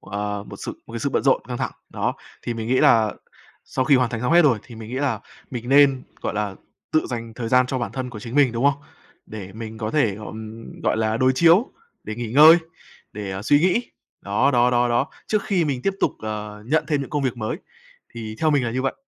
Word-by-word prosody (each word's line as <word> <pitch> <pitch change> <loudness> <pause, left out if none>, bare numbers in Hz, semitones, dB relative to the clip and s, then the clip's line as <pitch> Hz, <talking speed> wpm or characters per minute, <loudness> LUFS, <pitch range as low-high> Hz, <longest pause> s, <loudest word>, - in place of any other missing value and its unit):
ờ, 100 +1 -4
một - - -8
sự - - -5
một 115 - -12
cái 115 - -4
sự 140 - -1
bận - - 0
rộn, 135 -1 +3
căng 125 - -3
thẳng, - - -2 0.2
đó, - - -1 0.3
thì 120 - -3
mình 115 0 -4
nghĩ 130 - +3
là 110 -2 +5 0.5
sau 130 - -1
khi 140 -1 +5
hoàn 125 -2 +1
thành 115 -3 -3
xong 125 +6 0
hết 175 0 +7
rồi, 130 -7 +4
thì 120 - -13
mình 110 0 -9
nghĩ 130 - -4
là 140 -2 -1 0.3
mình 120 -1 -6
nên, 135 -2 +5 0.2
gọi - - -2
là, 105 -2 -2 0.4
tự 155 - +2
dành 115 -2 -5
thời 115 -2 -4
gian 125 +1 +4
cho 130 0 -2
bản 120 - -3
thân 130 -2 -4
của 110 -3 -8
chính 120 +3 -8
mình, 140 -4 +4
đúng 120 +3 -2
không? 145 0 +2 0.4
Để 100 -3 -8
mình 110 +1 -8
có 110 -1 -3
thể, 140 -8 +2
à, 105 - -8
ừm, 110 +1 -9
gọi - - +1
là, 110 0 0
đối 130 +2 +3
chiếu, 170 - +4 0.3
để 110 - -5
nghỉ 120 0 -5
ngơi, 155 +4 +9 0.6
để, 100 -2 -5
à, 95 +2 -5
suy 145 +6 +4
nghĩ. 185 +8 +1 0.3
Đó, 105 +8 +2
đó, 125 -2 +4
đó, 120 0 +2
đó, 120 +4 +1 0.2
trước 215 -2 +1
khi 185 -4 +1
mình 135 -4 -2
tiếp 195 - 0
tục, - - +2
ờ, 105 -1 -6
nhận 155 +4 +2
thêm 150 -3 +1
những 140 - -6
công 145 -1 -1
việc 130 -3 -1
mới 120 +7 -3 0.6
thì 110 -2 -6
theo 155 - +3
mình 140 -4 +2
là 115 - -1
như 130 +2 -1
vậy. 135 - -1
120 Hz, 255 wpm, -23 LUFS, 110-140 Hz, 0.6 s, ngơi